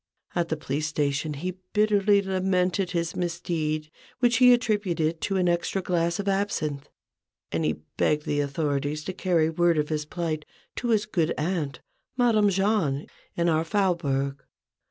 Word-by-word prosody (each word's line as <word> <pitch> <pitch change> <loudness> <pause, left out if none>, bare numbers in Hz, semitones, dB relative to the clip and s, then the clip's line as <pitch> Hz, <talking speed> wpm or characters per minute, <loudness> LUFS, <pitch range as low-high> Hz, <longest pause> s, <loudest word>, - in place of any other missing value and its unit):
At 170 -1 0
the 160 - -1
police 150 +1 -2
station 150 0 -1
he 180 +5 -5
bitterly 205 -1 +4
lamented 185 -1 +1
his 170 -1 -2
misdeed, 165 -3 -2 0.3
which 240 -1 +3
he 250 0 +7
attributed 200 -9 +1
to 195 - 0
an 180 -1 +2
extra 175 +2 0
glass 170 -2 0
of 200 -1 -4
absinthe, 160 -8 -1 0.6
and 80 0 -1
he 75 0 -1
begged 150 0 +1
the 145 - 0
authorities 145 +1 -1
to 185 - -4
carry 175 -4 +2
word 170 0 +2
of 150 0 0
his 150 -1 -1
plight 155 -1 -3 0.3
to 245 - -2
his 220 -3 +2
good 170 -6 0
aunt, 150 -4 -2 0.4
Madame 220 -4 +4
Jahn, 190 -8 +1 0.3
in 170 0 +1
our 160 -1 +2
Faubourg. 150 -8 0
170 Hz, 155 wpm, -26 LUFS, 150-195 Hz, 0.6 s, he